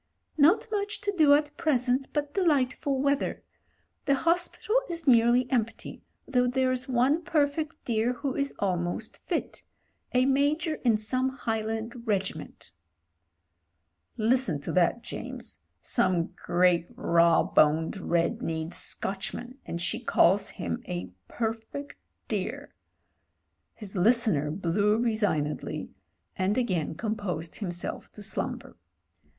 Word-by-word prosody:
'Not 315 +7 +4
much 410 0 -2
to 405 0 -1
do 300 -4 +6
at 295 0 -1
present, 265 -5 +1
but 295 -1 -2
delightful 285 -5 +1
weather. 280 +1 0 0.6
The 280 -1 +4
hospital 345 +7 0 0.2
is 335 -2 -4
nearly 240 0 +5
empty, 230 -3 -2 0.3
though 250 -2 +2
there's 255 0 0
one 260 +6 +3
perfect 305 -2 -1
dear 230 +1 +1
who 265 +1 -3
is 280 0 0
almost 180 +2 -1
fit - - -2 0.3
— - - -37
a 250 +1 +5
Major 295 +4 +1
in 230 -4 +4
some 255 +5 0
Highland 225 -1 -3
regiment.' 195 - -3 1.5
"Listen 225 - +2
to - - -4
that, 185 +6 +2
James. - - -7 0.2
Some 185 -8 +1
great 175 -1 +2
raw 170 0 +4
boned, 160 +5 +3
red 170 -2 0
kneed 160 +1 -3
Scotchman, 240 +7 -5
and 170 - -4
she 175 +7 -2
calls 200 -4 +3
him 85 -1 -4
a 90 +1 -4 0.2
perfect 225 +5 -4 0.3
dear!" - - -3 1.0
His 210 -3 -7
listener 195 - +3
blew 200 +6 +1
resignedly 210 -11 -1 0.4
and 190 +4 0
again 185 -11 0
com 215 +5 -2
posed 180 -6 -4
himself 175 -4 -5
to 210 - -9
slumber. 215 - -3
235 Hz, 120 wpm, -28 LUFS, 185-275 Hz, 1.5 s, do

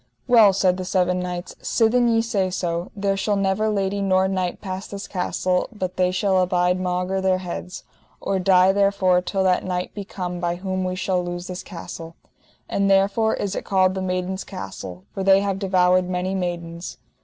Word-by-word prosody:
Well, 225 -5 +7
said 185 -1 +2
the 185 - -4
seven 180 0 +1
knights, 180 0 -5
sithen 240 +1 +2
ye 225 -1 +3
say 200 -5 0
so, 175 -1 -2
there 200 -1 0
shall 205 +1 0
never 195 +2 +1
lady 200 -1 -1
nor 190 -1 +3
knight 185 -2 -2
pass 190 -1 -5
this 200 0 -7
castle 180 -1 -1
but 185 -4 -4
they 180 0 +2
shall 185 +1 +2
abide 180 0 +1
maugre 180 +1 -1
their 190 -1 +2
heads, 180 0 -6 0.4
or 195 - -1
die 185 0 +5
therefore, 195 -2 +3
till 190 +1 -1
that 185 -1 +2
knight 180 -1 -3
be 205 - -5
come 180 -3 -5
by 175 0 -1
whom 185 +1 -3
we 185 0 -2
shall 185 -1 0
lose 175 0 -5
this 180 0 -6
castle. 165 -1 -9 0.5
And 200 0 0
therefore 200 +3 +3
is 200 -1 -3
it - - -3
called 185 -1 +2
the 190 - -3
Maidens' 185 +1 -2
Castle, 95 - -8
for - - -4
they 195 0 +5
have 195 -1 -1
devoured 185 -2 +3
many 185 +1 -1
maidens. 175 -2 -4
185 Hz, 190 wpm, -23 LUFS, 180-195 Hz, 0.5 s, Well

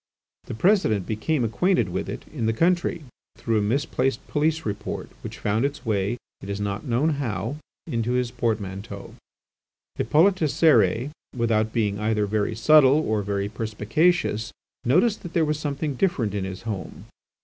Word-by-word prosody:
The - - -6
President 115 - +2
became 125 +6 -1
acquainted 120 - +1
with - - -3
it - - -6
in 110 - -1
the 115 - +2
country, 175 -1 +1 0.3
through 115 -2 0
a - - +1
misplaced 130 +4 0
police 160 +2 0
report 105 0 -4
which - - -7
found 105 +3 0
its 140 0 -3
way, 105 +1 0 0.2
it 100 - -8
is 100 0 -3
not 100 0 -3
known 125 +6 +2
how, 115 +2 -3 0.3
into 120 -5 -1
his 125 -1 0
portmanteau. 105 -5 -3 0.8
Hippolyte 180 +5 +4
Cérès, 150 -4 +3 0.2
without 110 -2 +1
being 105 -3 0
either 105 -1 +1
very 105 +1 -1
subtle, 140 +3 +6
or 110 -1 +1
very 100 0 -2
perspicacious, 110 +4 0 0.3
noticed 180 - +3
that 175 - -8
there 165 -2 +3
was 150 0 -1
something 145 0 -2
different 130 - 0
in 100 -2 -2
his 95 -1 -7
home. 105 -5 -6
115 Hz, 155 wpm, -24 LUFS, 105-150 Hz, 0.8 s, subtle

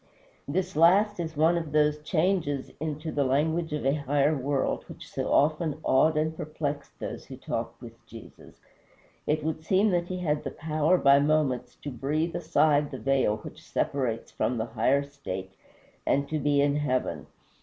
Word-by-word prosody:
This 185 +5 -2
last 190 +6 +4
is 160 -3 -4
one 165 +3 +4
of 160 -3 -7
those 150 0 +2
changes 155 -3 0
into 155 +1 -4
the 145 - +1
language 160 +5 +1
of 150 -3 -3
a 135 - +3
higher 145 +1 +1
world 135 0 -1
which - - -10
so - - -3
often 155 +1 +2
awed 155 +4 +3
and 155 +1 0
perplexed 150 -2 -5
those - - -6
who - - -9
talked - - -4
with - - -12
Jesus. - - -13 0.7
It 155 0 +1
would 160 0 -3
seem 195 +5 +3
that 175 -1 0
he 185 - -4
had 150 -4 -1
the - - -3
power 155 +3 +1
by 140 -3 +6
moments 145 -4 +1
to 145 - -4
breathe 150 +6 -1
aside 150 -3 +2
the 135 - -6
veil 135 -6 +1
which - - -10
separates 125 -5 -2
from 125 - -1
the 110 - -1
higher 120 +5 +1
state, 95 -10 -7 0.5
and 140 +1 +1
to 155 - -1
be 145 0 +2
in 145 0 +2
heaven. 130 -4 -1
150 Hz, 175 wpm, -27 LUFS, 140-160 Hz, 0.7 s, by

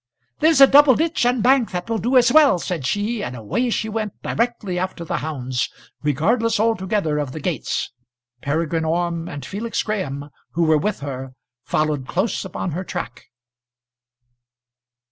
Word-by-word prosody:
"There's 315 -2 +4
a 275 - +11
double 280 -1 +7
ditch 320 -5 +1
and 245 -2 +1
bank 255 -2 +4
that 180 -1 -4
will 225 -1 -1
do 255 +3 +2
as 245 -1 +5
well," 300 -10 +6
said 170 -6 -3
she, 210 - -1
and 125 - -5
away 125 - -1
she 220 -1 -1
went 215 -2 -4
directly 230 -6 -1
after 185 -2 -4
the - - -2
hounds, 130 -5 -2 0.3
regardless 215 - +1
altogether 195 -7 0
of 140 -3 -3
the 155 - -5
gates. 155 -5 -2 0.5
Peregrine 160 +2 -1
Orme 170 +1 -1
and 145 -2 -7
Felix 225 - -3
Graham, 145 -9 -4 0.2
who 170 - +1
were 155 -1 +4
with 210 0 -2
her, 135 -2 -6 0.3
followed 150 -4 0
close 190 +5 -1
upon 190 -1 -4
her 180 +5 -3
track. 170 -10 -6
180 Hz, 160 wpm, -21 LUFS, 150-230 Hz, 0.5 s, a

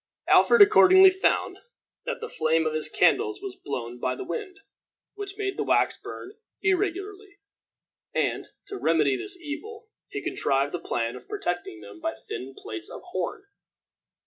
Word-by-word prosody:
Alfred 470 -3 +7
accordingly 380 -2 +7
found 380 +1 0 0.5
that - - -3
the 460 - -4
flame 160 - +1
of 155 - 0
his 155 0 -1
candles 415 - +2
was 390 -1 -7
blown 125 - -6
by 130 +1 -1
the - - -6
wind, 400 -4 -6 0.5
which 400 -1 -7
made 395 -2 -3
the - - 0
wax - - +2
burn 390 - -9 0.3
irregularly; 395 +1 -1 0.7
and, - - -1 0.2
to 400 -1 -7
remedy 150 -5 +2
the 125 - -5
evil, 430 +8 -8 0.2
he - - -4
contrived 140 +1 0
the 175 - -2
plan 115 -7 -2
of - - -13
protecting 175 - -4
them 100 +1 -12
by - - -2
thin 130 +4 -8
plates 110 0 -7
of - - -9
horn. 185 - -3
370 Hz, 155 wpm, -26 LUFS, -, 0.7 s, Alfred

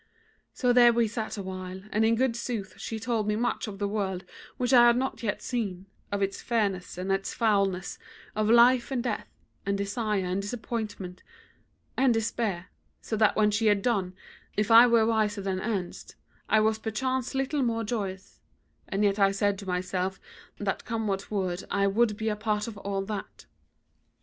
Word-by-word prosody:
So 250 -2 +1
there 240 -1 +7
we 235 -1 +2
sat 220 0 -4
awhile, 185 -1 -6
and 215 - +2
in 225 +1 +4
good 250 0 +1
sooth 225 -5 -4
she 225 - -5
told 225 -2 -1
me 210 - +1
much 240 +1 -1
of 200 -2 -7
the 200 0 -1
world 195 -3 -2 0.3
which 250 +1 0
I 240 -1 +8
had 235 0 +5
not 265 +1 -2
yet 210 -4 -2
seen, 200 -7 -3 0.3
of 200 0 0
its 195 0 -2
fairness 200 -7 -1
and 185 +2 -2
its 195 0 -1
foulness; 195 -5 +1 0.4
of 215 0 +1
life 235 +1 +6
and 255 -3 -1
death, 225 -5 -2 0.4
and 200 0 -1
desire 200 -1 -1
and 185 +2 -1
disappointment, 205 -4 -5 0.7
and 255 -3 +3
despair; 215 -5 -2 0.3
so 220 - -4
that 215 -1 +4
when 210 -1 +3
she 220 +2 +1
had 205 -1 +3
done, 195 -7 0 0.4
if 210 +2 +1
I 230 +2 +9
were 230 -2 +4
wiser 215 -2 +1
than 190 -1 -1
erst, 195 -4 -4 0.3
I 215 - +5
was 220 0 +2
perchance 255 +4 -2
little 270 +2 0
more 230 -2 0
joyous; 200 -4 -4 0.5
and 200 +1 0
yet 200 0 +2
I 195 -1 +5
said 200 0 0
to 200 - -9
myself 185 +1 -2 0.4
that 200 -2 -2
come 230 -2 -3
what 195 -1 -2
would 185 -3 -2
I 200 0 +1
would 210 +1 +2
be 220 0 -1
a 210 - -1
part 210 0 -1
of 230 - -6
all 195 -1 -2
that. 205 -1 -6
210 Hz, 185 wpm, -28 LUFS, 195-230 Hz, 0.7 s, I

